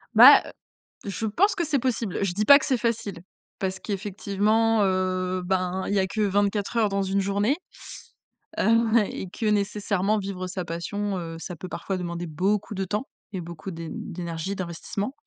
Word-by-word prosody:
Bah -, -, +10 dB
heu, -, -, -9 dB, 0.6 s
je 210 Hz, +3 st, -3 dB
pense 390 Hz, -, +2 dB
que 340 Hz, -, 0 dB
c'est 290 Hz, -3 st, +1 dB
possible. 235 Hz, -6 st, -1 dB
Je 190 Hz, -3 st, 0 dB
dis 210 Hz, +3 st, 0 dB
pas 280 Hz, +3 st, +9 dB
que -, -, -4 dB
c'est 260 Hz, -, +2 dB
facile, 225 Hz, -5 st, -2 dB, 0.4 s
parce 190 Hz, -1 st, -2 dB
qu'effectivement, 210 Hz, +2 st, +1 dB
heu, 185 Hz, -1 st, 0 dB
ben 185 Hz, 0 st, 0 dB
il -, -, -1 dB
y 200 Hz, -, +3 dB
a 190 Hz, -, +1 dB
que 215 Hz, +3 st, -2 dB
24 205 Hz, +2 st, +1 dB
heures 220 Hz, -2 st, +3 dB
dans 195 Hz, 0 st, 0 dB
une 195 Hz, +1 st, 0 dB
journée. 200 Hz, +7 st, +1 dB, 1.0 s
Heu, -, -, +2 dB, 0.3 s
ouais, 215 Hz, -4 st, +4 dB
et 190 Hz, -, -5 dB
que 220 Hz, -, -5 dB
nécessairement 205 Hz, 0 st, +1 dB
vivre 190 Hz, -2 st, -4 dB
sa 180 Hz, -1 st, -4 dB
passion, 195 Hz, +4 st, -3 dB
heu, 165 Hz, -1 st, -5 dB
ça 180 Hz, +1 st, -6 dB
peut 180 Hz, +3 st, -8 dB
parfois 195 Hz, -1 st, -3 dB
demander 175 Hz, -1 st, -4 dB
beaucoup 195 Hz, +7 st, 0 dB
de 195 Hz, 0 st, -2 dB
temps 210 Hz, +6 st, -2 dB, 0.3 s
et 185 Hz, -, -3 dB
beaucoup 170 Hz, +2 st, -7 dB
d'é 165 Hz, -1 st, -6 dB
d'énergie, 170 Hz, +2 st, -5 dB
d'investissement. 190 Hz, +5 st, -4 dB
195 Hz, 185 wpm, -25 LUFS, 185-210 Hz, 1.0 s, Bah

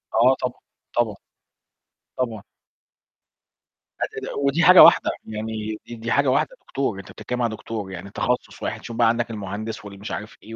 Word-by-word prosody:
آه 125 Hz, +4 st, +6 dB
طبعًا، 125 Hz, -1 st, -3 dB, 0.4 s
طبعًا. 115 Hz, -4 st, +1 dB, 1.0 s
طبعًا. 115 Hz, -5 st, -2 dB, 1.6 s
آآ، -, -, -3 dB
ودي 140 Hz, +5 st, +2 dB
حاجة 180 Hz, +2 st, +10 dB
واحدة -, -, +7 dB
يعني 110 Hz, 0 st, -4 dB
دي 120 Hz, -, -7 dB
دي 115 Hz, 0 st, -4 dB
حاجة 140 Hz, 0 st, +3 dB
واحدة 140 Hz, -, +1 dB
دكتور، 130 Hz, -8 st, -2 dB
أنت 95 Hz, -, -10 dB
بتتكلم 125 Hz, 0 st, -4 dB
على 115 Hz, -2 st, 0 dB
دكتور، 105 Hz, -4 st, -6 dB
يعني 95 Hz, +2 st, -7 dB
تخصص 125 Hz, +4 st, -2 dB
واحد، -, -, -3 dB
شوف 115 Hz, -1 st, -7 dB
بقى 120 Hz, -, +5 dB
عندك 120 Hz, 0 st, 0 dB
المهندس 105 Hz, +1 st, -5 dB
و -, -, -6 dB
المش 100 Hz, +1 st, -8 dB
عارف 105 Hz, +1 st, -6 dB
إيه 115 Hz, +1 st, -9 dB
115 Hz, 165 wpm, -23 LUFS, 105-125 Hz, 1.6 s, حاجة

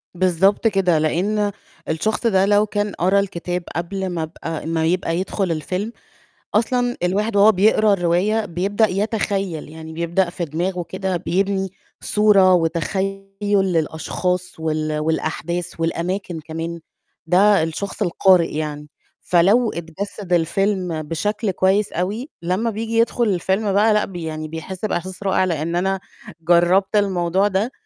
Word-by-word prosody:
بالضبط 185 Hz, +4 st, +3 dB
كده، 185 Hz, -6 st, +2 dB
لإن 205 Hz, +6 st, 0 dB, 0.4 s
الشخص 220 Hz, +8 st, 0 dB
ده 195 Hz, -2 st, +3 dB
لو 205 Hz, +1 st, +4 dB
كان 205 Hz, 0 st, -2 dB
قرا 190 Hz, +3 st, +2 dB
الكتاب 180 Hz, -2 st, -3 dB
قبل 190 Hz, +3 st, -3 dB
ما 170 Hz, -2 st, -2 dB
أبقى 160 Hz, 0 st, -6 dB
ما 165 Hz, -1 st, 0 dB
يبقى 170 Hz, -1 st, 0 dB
يدخُل 190 Hz, -1 st, -1 dB
الفيلم 185 Hz, +7 st, -3 dB, 0.6 s
أصلًا 245 Hz, +2 st, +1 dB
الواحد 205 Hz, +4 st, 0 dB
وهو 205 Hz, +2 st, +7 dB
بيقرا 210 Hz, +1 st, +4 dB
الرواية 195 Hz, +5 st, +1 dB
بيبدأ 200 Hz, +5 st, +1 dB
يتخيّل 195 Hz, -5 st, -2 dB
يعني 160 Hz, 0 st, -9 dB
بيبدأ 170 Hz, +2 st, 0 dB
في 170 Hz, 0 st, -4 dB
دماغه 175 Hz, +4 st, -2 dB
كده 190 Hz, -1 st, -2 dB
بيبني 195 Hz, +2 st, -1 dB, 0.3 s
صورة 200 Hz, -3 st, +4 dB
وتخيُّل 190 Hz, +4 st, -1 dB
للأشخاص 180 Hz, -2 st, 0 dB
وال 155 Hz, -1 st, -1 dB
والأحداث 160 Hz, +2 st, -2 dB
والأماكن 170 Hz, +1 st, -2 dB
كمان، 165 Hz, +2 st, -5 dB, 0.5 s
ده 195 Hz, 0 st, +5 dB
الشخص 195 Hz, +6 st, -4 dB
القارئ 180 Hz, -3 st, +3 dB
يعني، 150 Hz, -1 st, -4 dB, 0.3 s
فلو 205 Hz, +7 st, +3 dB
اتجسّد 175 Hz, +3 st, -5 dB
الفيلم 180 Hz, 0 st, 0 dB
بشكل 200 Hz, +7 st, -2 dB
كويس 190 Hz, +3 st, +1 dB
أوي 210 Hz, -, -2 dB
لمّا 185 Hz, +7 st, 0 dB
بييجي 225 Hz, +1 st, -3 dB
يدخُل 235 Hz, +1 st, +2 dB
الفيلم 190 Hz, +2 st, 0 dB
بقى 215 Hz, +2 st, +4 dB
لأ، 210 Hz, -, +2 dB
ب 190 Hz, -, -12 dB
يعني 155 Hz, -2 st, -4 dB
بيحس 175 Hz, +5 st, -6 dB
بإحساس 185 Hz, 0 st, -3 dB
رائع 190 Hz, -1 st, +2 dB
لإن 170 Hz, 0 st, -2 dB
أنا 190 Hz, +2 st, 0 dB, 0.4 s
جرّبت 175 Hz, +5 st, +3 dB
الموضوع 190 Hz, -1 st, +2 dB
ده، 205 Hz, +6 st, -1 dB
185 Hz, 135 wpm, -21 LUFS, 170-205 Hz, 0.6 s, وهو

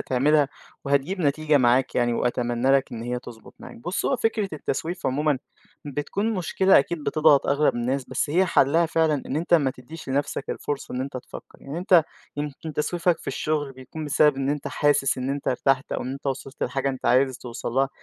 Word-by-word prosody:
تعملها 145 Hz, +3 st, +2 dB, 0.4 s
وهتجيب 140 Hz, +7 st, 0 dB
نتيجة 150 Hz, 0 st, +2 dB
معاك 125 Hz, +1 st, +3 dB
يعني، 120 Hz, 0 st, +2 dB
وأتمنى 120 Hz, +1 st, 0 dB
لك 135 Hz, -1 st, +2 dB
إن 115 Hz, -1 st, -5 dB
هي 125 Hz, +1 st, -2 dB
تضبط 120 Hz, -3 st, -13 dB
معاك، -, -, -11 dB
بُصّ، 175 Hz, +11 st, -3 dB
هو 270 Hz, -, +2 dB
فكرة 220 Hz, -4 st, 0 dB
التسويف 160 Hz, +3 st, -3 dB
عمومًا 145 Hz, +1 st, +1 dB, 0.5 s
بتكون 170 Hz, -, -2 dB
مشكلة 190 Hz, +1 st, +4 dB
أكيد 150 Hz, +2 st, -2 dB
بتضغط 155 Hz, -3 st, +4 dB
أغلب 145 Hz, 0 st, +2 dB
الناس، 125 Hz, +3 st, -1 dB
بس 145 Hz, -, -1 dB
هي 185 Hz, +4 st, +3 dB
حلّها 160 Hz, +4 st, +3 dB
فعلًا 160 Hz, -3 st, +1 dB
إن 140 Hz, -, -3 dB
أنت 170 Hz, +2 st, +2 dB
ما 140 Hz, -5 st, +3 dB
تديش 155 Hz, +5 st, -11 dB
لنَفسك 140 Hz, 0 st, -2 dB
الفرصة 145 Hz, -3 st, -4 dB
إن 125 Hz, -, -2 dB
أنت 135 Hz, 0 st, -4 dB
تفكّر، 125 Hz, -, -10 dB
يعني 140 Hz, +4 st, -5 dB
أنت 175 Hz, -2 st, +5 dB, 0.3 s
يمكن 150 Hz, +2 st, -5 dB
تسويفك 170 Hz, +3 st, 0 dB
في -, -, -15 dB
الشغل 150 Hz, -3 st, -2 dB
بيكون 130 Hz, +4 st, -8 dB
بسبب 150 Hz, -1 st, +3 dB
إن 135 Hz, 0 st, -1 dB
أنت 145 Hz, 0 st, -3 dB
حاسس 145 Hz, -3 st, +2 dB
إن 130 Hz, +1 st, -2 dB
أنت 140 Hz, 0 st, -2 dB
ارتحت 130 Hz, +1 st, +1 dB
أو -, -, -2 dB
إن 130 Hz, +2 st, -4 dB
أنت 140 Hz, +1 st, -8 dB
وصلت 135 Hz, +1 st, -4 dB
لحاجة 135 Hz, 0 st, -1 dB
أنت 130 Hz, -1 st, -4 dB
عايز 130 Hz, +1 st, +3 dB
توصل 120 Hz, -2 st, -6 dB
لها، 135 Hz, +1 st, +2 dB
140 Hz, 195 wpm, -24 LUFS, 130-155 Hz, 0.5 s, أنت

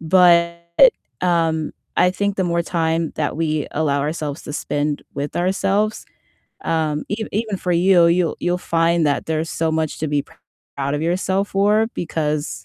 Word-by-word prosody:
but, 170 Hz, 0 st, +4 dB, 0.6 s
um, 165 Hz, -3 st, +1 dB, 0.2 s
I 180 Hz, -, +4 dB
think 200 Hz, +2 st, -2 dB
the 190 Hz, -, +1 dB
more 170 Hz, -1 st, 0 dB
time 165 Hz, -2 st, -1 dB
that 145 Hz, -2 st, -1 dB
we 155 Hz, -2 st, -1 dB
allow 145 Hz, -2 st, 0 dB
ourselves 150 Hz, 0 st, -3 dB
to -, -, -7 dB
spend 145 Hz, 0 st, -2 dB
with 145 Hz, +1 st, -4 dB
ourselves, 195 Hz, +4 st, 0 dB, 0.6 s
um, 155 Hz, -2 st, 0 dB
ev 220 Hz, +2 st, -3 dB
even 215 Hz, -1 st, -1 dB
for 180 Hz, -, -1 dB
you, 180 Hz, +1 st, +4 dB
you'll 170 Hz, 0 st, +2 dB
you'll 175 Hz, 0 st, 0 dB, 0.2 s
find 165 Hz, -1 st, +3 dB
that 145 Hz, -, 0 dB
there's 160 Hz, 0 st, -2 dB
so 165 Hz, -, -1 dB
much 160 Hz, -1 st, -1 dB
to 155 Hz, -, -1 dB
be 145 Hz, -1 st, 0 dB, 0.5 s
proud 140 Hz, +1 st, -1 dB
of 145 Hz, -, -2 dB
yourself 190 Hz, +4 st, 0 dB
for 210 Hz, +3 st, +3 dB
because, 155 Hz, -3 st, -2 dB
165 Hz, 160 wpm, -20 LUFS, 155-180 Hz, 0.6 s, but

